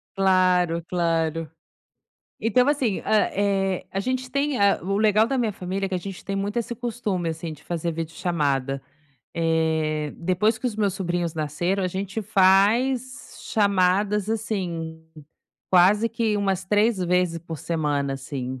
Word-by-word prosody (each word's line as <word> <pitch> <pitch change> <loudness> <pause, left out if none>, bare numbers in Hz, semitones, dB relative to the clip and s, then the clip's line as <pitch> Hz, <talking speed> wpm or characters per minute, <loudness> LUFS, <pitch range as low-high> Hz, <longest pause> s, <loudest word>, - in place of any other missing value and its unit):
Claro, 180 -3 +3
claro. 165 -2 0 0.9
Então 250 +4 +3
assim, 260 -9 +1
hã, 215 -1 +3
eh, 195 -2 0
a 195 - -2
gente 255 +3 -2
tem 280 -2 0
a 200 0 +4
o 195 +2 -1
legal 215 +1 +4
da 270 - -1
minha 225 -4 0
família 190 +1 -3
é - - -4
que 190 - -3
a - - 0
gente 195 +1 -8
tem 195 0 -3
muito 205 +3 -3
esse 235 +1 -3
costume, 215 -8 -2
assim, 160 0 -5
de 150 0 -14
fazer 170 -1 -2
videochamada. 150 -5 -1 0.5
Eh, 160 -2 0
depois 190 +6 +1
que 255 - -3
os 225 - -2
meus 205 -3 0
sobrinhos 175 -3 -2
nasceram, 175 +6 -1
a - - +2
gente 195 +4 -3
faz 230 +8 +2
chamadas, 200 0 +2
assim, 175 -8 -3 0.7
quase 200 +5 +5
que 225 -2 0
umas 195 -2 0
3 210 +2 +2
vezes 180 -1 +1
por 165 -2 -8
semana, 145 -4 -1
assim, 130 -1 -5
190 Hz, 150 wpm, -24 LUFS, 165-210 Hz, 0.9 s, quase